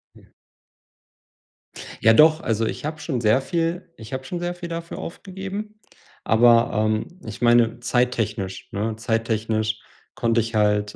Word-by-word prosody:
Ja. - - -20 1.7
Ja, 115 +1 +6
doch, 155 +5 +6
also, 115 0 0
ich 125 - -4
habe 155 0 -4
schon 130 -7 -3
sehr 110 +4 +3
viel 170 +3 -2
ich 110 +3 -10
habe 130 - -3
schon 175 +6 -5
sehr 175 0 -2
viel 175 -1 -7
dafür 170 0 -6
aufgegeben, 195 +4 -7 0.4
aber, 115 +1 +5
ähm, 110 - -1
ich 110 +2 -8
meine 120 -1 +4
zeittechnisch, 115 -5 -1
ne 110 +2 -2
zeittechnisch 110 -1 -1 0.4
konnte 115 0 +2
ich 115 +1 -5
halt, 105 -1 +1
120 Hz, 140 wpm, -23 LUFS, 110-165 Hz, 1.7 s, Ja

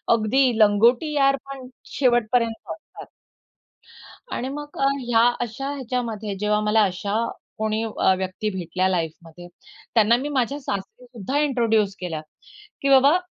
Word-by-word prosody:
अगदी 235 +2 +2
लंगोटी 230 +8 +4
यार 275 -1 +4
पण 270 -2 -9 0.3
शेवटपर्यंत 240 -3 +1
असतात. 315 - -13 1.3
आणि 255 +2 -3
मग 295 +1 -8
अ, 275 - +3 0.2
ह्या 230 -1 +3 0.2
अशा 240 +4 -4
ह्याच्यामध्ये 230 -6 -3
जेव्हा 210 +1 +1
मला 215 +1 +3
अशा 195 +1 -2 0.4
कोणी 220 +1 -1
अ, 215 -3 +1
व्यक्ती 190 +3 -3
भेटल्या 185 0 -1
लाईफमध्ये, 170 0 -4 0.5
त्यांना 225 +2 +5
मी 285 +3 -4
माझ्या 275 +1 -1
सासरी 200 0 -6
सुद्धा 245 +3 -4
इंट्रोड्यूस 225 -8 +1
केलं, 165 -4 -4 0.6
की 275 - +1
बाबा 275 +5 +6
225 Hz, 130 wpm, -23 LUFS, 205-265 Hz, 1.3 s, बाबा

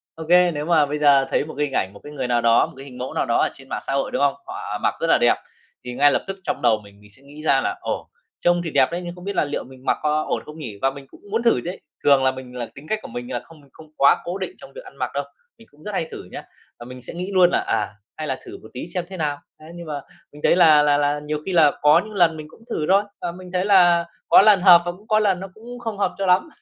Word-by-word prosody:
Ô 160 - -7
kê, 180 0 +5
nếu 150 -2 -4
mà 160 -4 +4
bây 150 +1 -3
giờ 140 -2 +5
thấy - - +1
một 155 - -9
cái 150 - +1
hình 135 - -9
ảnh, 95 +1 0
một 100 - -14
cái 145 - -9
người 130 -3 -3
nào 120 -1 +1
đó, 115 0 +4
một - - -13
cái 135 - -10
hình 125 -2 -11
mẫu 130 +1 -5
nào - - 0
đó 115 - +1
ở - - +3
trên 135 0 -15
mạng - - -4
xã - - -2
hội, 135 0 0
đúng - - -2
không? 140 -1 +3
Họ - - -5
mặc - - +1
rất - - 0
là - - +4
đẹp, - - +4 0.5
thì 125 0 -6
ngay 145 +2 +4
lập - - 0
tức 195 0 -5
trong 185 - -3
đầu 110 -1 +3
mình 100 0 -17
mình 105 0 -18
sẽ 130 - -18
nghĩ 145 +2 -13
ra - - +3
là 370 0 -2
"Ồ, - - -4 0.3
trông 175 0 +2
thì 165 - -3
đẹp 135 -2 +3
đấy 175 - -2
nhưng 175 0 -6
không 180 0 -12
biết 200 - -4
là - - +3
liệu 145 - -4
mình 130 0 -15
mặc - - +2
có 155 0 +1
ổn - - -1
không 150 +1 -11
nhỉ?" 110 -9 -7
Và 135 - +3
mình 135 0 -11
cũng - - -18
muốn 225 +2 0
thử 235 - +3
chứ. 175 - -3 0.3
Thường 140 -2 +5
là 130 - +4
mình 130 -1 -10
là 120 -1 -3
tính 140 +3 -12
cách 215 - 0
của - - -9
mình 120 +2 -7
là 120 - -2
không 165 -2 -17
không 155 -1 -16
quá 140 - +5
cố 180 +3 -4
định 280 - -4
trong - - -13
việc - - -10
ăn - - -14
mặc - - -3
đâu, - - -1 0.3
mình 225 - -17
cũng 150 +1 -22
rất 210 - -6
hay 165 -4 -2
thử - - -8
nhá, - - -6 0.4
và 120 - -10
mình 125 0 -10
sẽ 125 - -9
nghĩ 180 +3 -5
luôn 180 -1 +6
là - - +2
"À, 105 - 0 0.3
hay 155 -1 -5
là 130 - -2
thử - - -10
một - - -14
tí 125 - -6
xem 180 0 -4
thế 190 - -8
nào." 145 -3 -2 0.2
Thế 155 - -14
nhưng 170 -1 -9
mà 145 -2 -4 0.3
mình 150 - -14
thấy - - +4
là 155 -4 +6
là 145 -1 +3
là 145 0 +1
nhiều 150 0 -3
khi 190 - -2
là 155 -4 +6
có 150 0 +6
những 215 -1 -10
lần 170 -4 +3
mình 155 -1 -8
cũng 225 - -19
thử 155 - -2
thôi, 195 +2 +5 0.2
và 170 - -3
mình 180 0 -11
thấy 180 +1 0
là 175 -4 +5 0.2
có - - +8
lần 205 -3 +6
hợp 175 -3 +8
và 175 - -1
cũng 205 +5 -18
có 215 -1 +4
lần 195 -4 +1
nó 195 - -6
cũng 240 +3 -10
không 225 -4 -5
hợp - - 0
cho 195 - -1
lắm. 185 - +3
155 Hz, 320 wpm, -22 LUFS, 135-180 Hz, 0.5 s, có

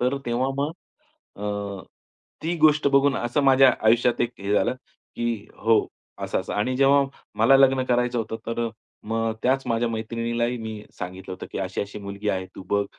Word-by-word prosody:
तर 125 +3 +1
तेव्हा 120 +2 0
मग 145 +2 0 0.7
अ, 100 -2 -4 0.6
ती 170 +2 -1
गोष्ट 155 -1 +5
बघून 140 0 +3
असं 120 +4 0
माझ्या 135 -1 +6
आयुष्यात 120 +2 +4
एक 120 - 0
हे 100 +1 -2
झालं 105 - +2 0.4
की 120 0 0 0.2
हो 115 0 +3 0.4
असं-असं - - -2
आणि 120 +5 0
जेव्हा 140 +1 +5 0.3
मला 135 - +6
लग्न 135 -1 +4
करायचं 125 -1 +1
होतं. 110 0 -3
तर 115 0 -2
अ, - - -4 0.4
मग 115 0 0
त्याच 135 +2 +2
माझ्या 115 +1 +1
मैत्रिणीलाही 115 +2 -2
मी 110 -2 -6 0.2
सांगितलं 95 +1 -6
होतं 95 - -8
की - - -3
अशी-अशी 100 +2 -4
मुलगी 100 +1 -5
आहे 95 -1 -2
तू - - -7
बघ. 100 0 +2
120 Hz, 170 wpm, -24 LUFS, 105-130 Hz, 0.7 s, माझ्या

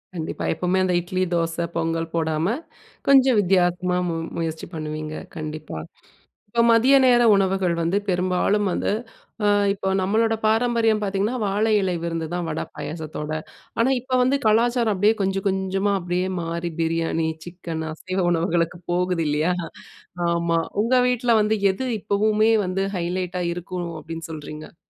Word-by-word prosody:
கண்டிப்பா, 160 -2 -4
எப்பவுமே 180 +3 0
அந்த 185 -1 +1
இட்லி, 185 +2 -2
தோசை, 165 0 0
பொங்கல் 165 0 -1
போடாம. 160 0 0 0.6
கொஞ்சம் 265 -4 +6
வித்தியாசமா 180 -1 +2 0.4
முயற்சி 160 -1 -3
பண்ணுவீங்க. 155 0 -5 0.2
கண்டிப்பா, 155 - -6 0.7
இப்ப 235 +2 +2
மதிய 255 +5 +5
நேர 245 -1 +5
உணவுகள் 190 -2 +1
வந்து, 170 +4 +1
பெரும்பாலும் 185 +3 +1
வந்து, - - -1 0.5
அ - - +3 0.3
இப்போ 195 -1 -3
நம்மளோட 225 +4 +2
பாரம்பரியம் 225 0 +2
பார்த்தீங்கன்னா, 200 +5 0
வாழை 210 +3 +1
இலை 185 -2 0
விருந்து 165 -1 -2
தான் 175 -1 -2
வட 155 - -3
பாயாசத்தோட. 155 -1 -6 0.5
ஆனா, 235 +3 +3
இப்ப 255 +1 -1
வந்து, 265 +3 +2
கலாச்சாரம் 230 0 +3
அப்டியே 205 +4 +3
கொஞ்ச 195 0 0
கொஞ்சமா, 190 +1 0
அப்டியே 180 +1 -1
மாறி, 170 +1 -3
பிரியாணி, 165 0 0 0.2
சிக்கன், 170 -2 -6
அசைவ 185 +4 -4
உணவுகளுக்கு 170 0 0
போகுது 180 -2 0
இல்லையா? 155 +4 +1 0.8
ஆமா, 170 -1 +1 0.2
உங்க 250 +3 +2
வீட்ல 245 -1 +2
வந்து, 215 +1 +1 0.2
எது 260 +7 -4
இப்பவுமே 215 +2 +2
வந்து 190 +2 -1
ஹைலைட்டா 180 +1 -2
இருக்கனும், 175 -1 -5
அப்டின்னு 165 0 -7
சொல்றீங்க? 155 +1 -9
180 Hz, 135 wpm, -23 LUFS, 165-210 Hz, 0.8 s, கொஞ்சம்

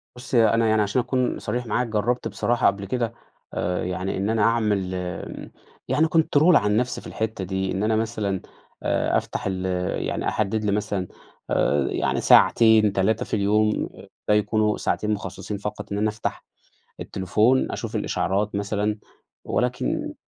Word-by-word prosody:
بُص 125 +1 -11
ي 115 -2 +6
أنا 115 0 +2
يعني 110 -1 +3
عشان 105 +5 +1
أكون 125 0 -1
صريح 125 0 -3
معاك، 120 +2 0
جرّبت 115 +2 0
بصراحة 115 +3 +1
قبل 100 0 0
كده 115 +2 -2 0.4
آآ، 90 +1 -1
يعني 90 +1 -3
إن 100 +2 -1
أنا 110 -1 +1
أعمل 105 -5 +1
آآ، 90 -1 -6 0.4
يعني 150 +5 +2
control 160 +1 +4
على 105 - +4
النفْس 120 +5 0
في - - -11
الحِتّة 110 -3 -3
دي، 95 +1 -2
إن 95 +2 -1
أنا 110 0 +2
مثلًا 110 -4 -1 0.4
آآ - - +1
أفتَح - - -4
ال 95 -1 -2 0.4
يعني - - -2
أحدّد 110 +1 -1
لي 100 - +1
مثلًا 100 -2 -1 0.4
آآ، 70 -1 +2
يعني - - 0
ساعتين، 110 -3 +5
3 100 +3 +1
في - - -12
اليوم، 105 +1 +1 0.4
ده 105 - +4
يكونوا 105 0 +2
ساعتين 105 0 -1
مُخصّصين 105 0 -5
فقط 105 +1 -6
إن 100 - -1
أنا 105 +1 +1
أفتَح 105 0 -4 0.6
التليفون 105 +7 +1
أشوف - - -4
الإشعارات 100 +2 -1
مثلًا 105 +1 -1 0.5
ولكن 125 0 -1
105 Hz, 160 wpm, -24 LUFS, 100-115 Hz, 0.6 s, ي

